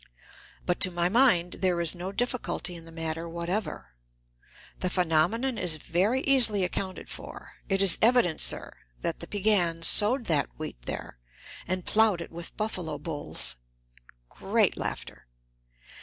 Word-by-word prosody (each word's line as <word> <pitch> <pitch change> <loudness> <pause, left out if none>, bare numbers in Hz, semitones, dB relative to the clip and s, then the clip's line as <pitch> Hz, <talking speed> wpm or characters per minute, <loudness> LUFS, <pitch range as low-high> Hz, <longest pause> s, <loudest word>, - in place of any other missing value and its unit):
But 180 - 0
to 185 - +7
my 175 0 0
mind 190 -7 +3
there 180 -2 +1
is 170 -2 +2
no 180 +2 -6
difficulty 245 -4 -1
in 165 -1 -10
the 165 - -13
matter 165 0 -4
whatever. 170 - -4 0.9
The 185 - -1
phenomenon 185 +9 +1
is 170 -3 0
very 195 - 0
easily 240 -8 +3
accounted 185 +1 -4
for. - - -10 0.2
It 195 0 +2
is 190 -4 +3
evident, 230 -8 +4
sir, - - +3 0.3
that - - -3
the - - -7
Piegans 185 -5 +1
sowed 235 +4 +4
that 150 -4 +1
wheat 155 - -7
there - - -6 0.5
and 185 0 -2
plowed 215 -4 +3
it 170 - -8
with 170 +1 -9
buffalo 180 -8 -3
bulls. 145 - -1 0.7
(Great - - +1
laughter.) - - -6
180 Hz, 140 wpm, -27 LUFS, 165-210 Hz, 0.9 s, to